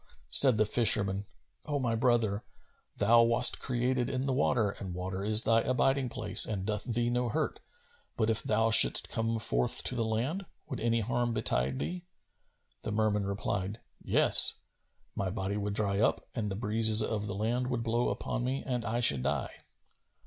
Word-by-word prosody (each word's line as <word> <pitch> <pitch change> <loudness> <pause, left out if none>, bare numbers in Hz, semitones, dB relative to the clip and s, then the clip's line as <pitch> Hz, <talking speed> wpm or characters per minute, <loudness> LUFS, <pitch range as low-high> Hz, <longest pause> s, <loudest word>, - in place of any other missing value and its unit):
'" - - -34
Said 130 -5 +6
the 110 - +2
fisherman, 105 -3 +3 0.4
"O 145 -1 -3
my 120 -4 -2
brother, 115 -3 0 0.5
thou 115 +3 +4
wast 115 0 +4
created 125 0 -2
in 130 0 -3
the 135 - -1
water 120 -6 0
and 95 -3 -9
water 95 +1 -5
is 110 +2 +3
thy 115 0 +2
abiding 130 +1 -1
place 105 -3 +4
and 100 -3 -2
doth 105 0 -4
thee 120 0 -2
no 125 0 -2
hurt, 155 +5 -3 0.6
but, 110 - 0
if 115 0 0
thou 110 +1 0
shouldst - - +7
come 115 0 -2
forth 60 - -2
to - - -3
the 120 -2 -2
land, 130 - -3 0.2
would 135 -5 -6
any 115 0 -1
harm 120 +1 -2
betide 65 - 0
thee?" 180 - -5 0.8
The - - -6
Merman 105 -1 -1
replied, 100 +1 -4 0.2
"Yes; - - +4 0.6
my 100 -1 -3
body 95 0 -4
would 105 0 -4
dry 100 -2 0
up 110 - -1
and 110 -4 -4
the 95 - -5
breezes 110 0 +3
of 105 -2 -4
the 100 - -5
land 120 +5 -2
would 120 -2 -3
blow 120 +1 -1
upon 125 - -4
me 130 +2 -3
and 125 -3 -3
I 115 +3 -3
should 70 - +4
die." - - -3
115 Hz, 180 wpm, -29 LUFS, 105-120 Hz, 0.8 s, shouldst